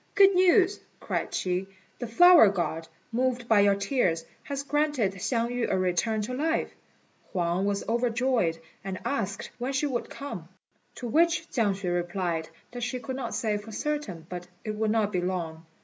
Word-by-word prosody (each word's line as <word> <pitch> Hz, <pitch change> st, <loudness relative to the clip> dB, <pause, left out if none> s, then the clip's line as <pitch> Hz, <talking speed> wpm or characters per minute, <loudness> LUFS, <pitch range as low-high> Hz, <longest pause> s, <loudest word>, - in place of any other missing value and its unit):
"Good 395 Hz, 0 st, +7 dB
news!" 370 Hz, +2 st, +4 dB, 0.2 s
cried -, -, -2 dB
she, 185 Hz, +1 st, -1 dB, 0.3 s
"the 240 Hz, -, -3 dB
Flower 345 Hz, -, +8 dB
God, 165 Hz, -4 st, -2 dB, 0.2 s
moved 245 Hz, 0 st, 0 dB
by 220 Hz, -3 st, +5 dB
your 200 Hz, 0 st, +5 dB
tears, 200 Hz, -, 0 dB, 0.2 s
has 280 Hz, -1 st, -4 dB
granted 290 Hz, -8 st, +1 dB
Hsiang 230 Hz, +5 st, -1 dB
yü 245 Hz, -1 st, -1 dB
a -, -, +1 dB
return 185 Hz, +4 st, 0 dB
to 250 Hz, -, -4 dB
life." 320 Hz, +5 st, 0 dB, 0.6 s
Huang 180 Hz, +2 st, 0 dB
was 200 Hz, 0 st, -2 dB
overjoyed, 235 Hz, -6 st, +1 dB, 0.3 s
and 190 Hz, -1 st, -4 dB
asked 215 Hz, -8 st, -2 dB
when 255 Hz, +3 st, -2 dB
she 265 Hz, +3 st, +1 dB
would 255 Hz, -4 st, -2 dB
come; 185 Hz, -, -7 dB, 0.5 s
to 245 Hz, -, -5 dB
which 330 Hz, +5 st, +2 dB
Chiang 220 Hz, -5 st, +2 dB
hsüeh 190 Hz, -2 st, -2 dB
replied, 175 Hz, -2 st, -2 dB, 0.2 s
that 245 Hz, 0 st, -6 dB
she 250 Hz, +1 st, -2 dB
could 260 Hz, +1 st, -5 dB
not 250 Hz, -3 st, -4 dB
say 215 Hz, -2 st, 0 dB
for 205 Hz, +2 st, -9 dB
certain, 220 Hz, -, -3 dB
but 180 Hz, 0 st, -5 dB
that -, -, -26 dB, 0.2 s
it -, -, -5 dB
would 220 Hz, 0 st, 0 dB
not 215 Hz, -1 st, +1 dB
be 180 Hz, -3 st, 0 dB
long. 165 Hz, -3 st, -3 dB
225 Hz, 180 wpm, -27 LUFS, 185-260 Hz, 0.6 s, Flower